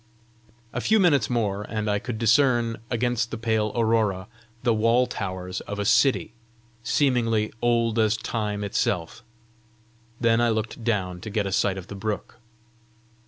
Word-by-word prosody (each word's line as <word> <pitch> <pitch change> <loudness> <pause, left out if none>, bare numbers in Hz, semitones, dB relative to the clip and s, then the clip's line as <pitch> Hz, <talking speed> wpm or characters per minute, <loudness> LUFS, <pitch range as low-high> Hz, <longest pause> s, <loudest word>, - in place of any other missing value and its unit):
A - - -2
few 220 0 +3
minutes 145 - +3
more, 105 -5 0
and 110 0 -4
I 105 -1 +1
could 120 0 -5
discern, 115 0 +3
against 120 -1 0
the 115 - -5
pale 110 -2 0
aurora, 110 -5 +1 0.4
the 120 - +3
wall 115 +3 +3
towers 95 -4 -5
of 100 - -4
a 105 - -2
city 130 +1 +3 0.5
seemingly 115 -5 +1
old 115 -1 +2
as 110 0 +3
time 105 -3 -3
itself. 95 -2 -1 1.0
Then 115 -1 +3
I 120 - +3
looked 110 +1 -3
down 95 -6 -1
to 110 - -6
get 105 -1 -1
a 95 - -3
sight 95 0 +1
of 95 - -7
the - - -9
brook. 105 +1 -5
110 Hz, 155 wpm, -25 LUFS, 105-120 Hz, 1.0 s, few